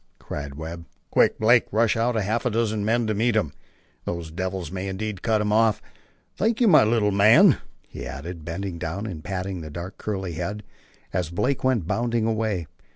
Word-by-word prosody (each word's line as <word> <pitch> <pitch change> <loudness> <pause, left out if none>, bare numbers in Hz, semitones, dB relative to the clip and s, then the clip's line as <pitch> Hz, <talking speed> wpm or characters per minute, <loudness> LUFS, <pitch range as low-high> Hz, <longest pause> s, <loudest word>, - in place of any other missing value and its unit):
cried 70 -1 -6
Webb. 80 +2 -7 0.3
"Quick, - - +4
Blake; 120 +2 +4
rush 110 +1 +3
out 115 +2 +1
half 110 +2 0
a 125 - +1
dozen 110 -2 0
men 115 +2 +1
to 110 - 0
meet 115 +2 +1
him. 90 -10 0 0.5
Those 85 -2 -4
devils 90 -1 -4
may 95 +1 -4
indeed 100 +1 -4
cut 110 -2 +1
him 105 0 0
off. 110 -1 +3 0.6
Thank 225 +3 +1
you, 240 - +4
my 155 - +7
little 110 -1 +2
man," 100 +3 +6 0.3
he - - -7
added, 80 +4 -7
bending 85 +2 -5
down 85 +5 -4
and 85 -8 -6
patting 95 -1 -4
the 80 - -7
dark 85 +5 -7
curly 95 -4 -3
head, 100 +6 -4 0.5
as 90 -3 -1
Blake 125 +10 -1
went 130 -9 +2
bounding 115 +3 0
away. 110 -6 -1
105 Hz, 185 wpm, -24 LUFS, 85-115 Hz, 0.6 s, my